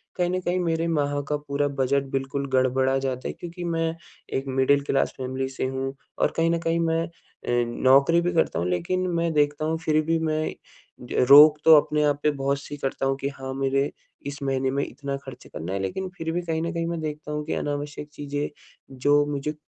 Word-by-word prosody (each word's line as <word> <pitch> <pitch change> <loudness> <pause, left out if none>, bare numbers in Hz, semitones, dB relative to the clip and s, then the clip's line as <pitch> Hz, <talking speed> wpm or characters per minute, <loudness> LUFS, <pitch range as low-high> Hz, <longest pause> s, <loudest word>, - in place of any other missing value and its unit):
कहीं 175 -2 +1
न 185 - 0
कहीं 180 +1 0
मेरे 165 -1 0
माह 145 -3 0
का 150 - +1
पूरा 145 0 -1
बजट 140 0 +1
बिल्कुल 135 +1 -2
गड़बड़ा 130 +1 +2
जाता 130 -1 -3
है - - -4
क्योंकि 175 +1 -8
मैं 165 -1 -1 0.4
एक 135 - -1
मिडिल 135 +2 +3
क्लास 135 -1 0
फ़ैमिली 130 0 -3
से 130 - -3
हूँ। 135 +1 -3 0.3
और - - +2
कहीं 165 0 +3
न 170 - +1
कहीं 165 0 0
मैं 165 0 +1
अ, - - -11 0.7
नौकरी 140 +6 +5
भी 175 +1 0
करता 160 - +1
हूँ 90 - -1
लेकिन 185 - 0
मैं 170 0 +1
देखता 145 +1 +1
हूँ 160 +1 0
फिर 155 0 +3
भी 165 0 +1
मैं 155 -1 -1 0.6
ज - - +2
रोक 150 +2 +10
तो 160 - +10
अपने 150 0 0
आप 145 -1 +1
पे 150 - +4
बहुत-सी 140 +1 -2
करता 135 -1 -2
हूँ 135 0 +1
कि 140 - -1
हाँ 135 -1 -7
मेरे 135 +1 0 0.4
इस 140 0 -6
महीने 135 -1 0
में 140 +1 0
इतना 140 -1 -5
खर्च - - -10
करना 85 +5 -6
है, 100 - -1
लेकिन 95 - -3
फिर 165 -1 -3
भी 175 - -1
कहीं 160 -2 -2
न 170 +1 -2
कहीं 165 0 -1
मैं 170 -1 -2
देखता 150 -1 -5
हूँ 150 0 -2
कि - - -2
अनावश्यक 145 0 -4
चीजें 145 0 -3 0.5
जो 145 +2 +4
मुझे 145 +2 -2
145 Hz, 215 wpm, -25 LUFS, 135-165 Hz, 0.7 s, रोक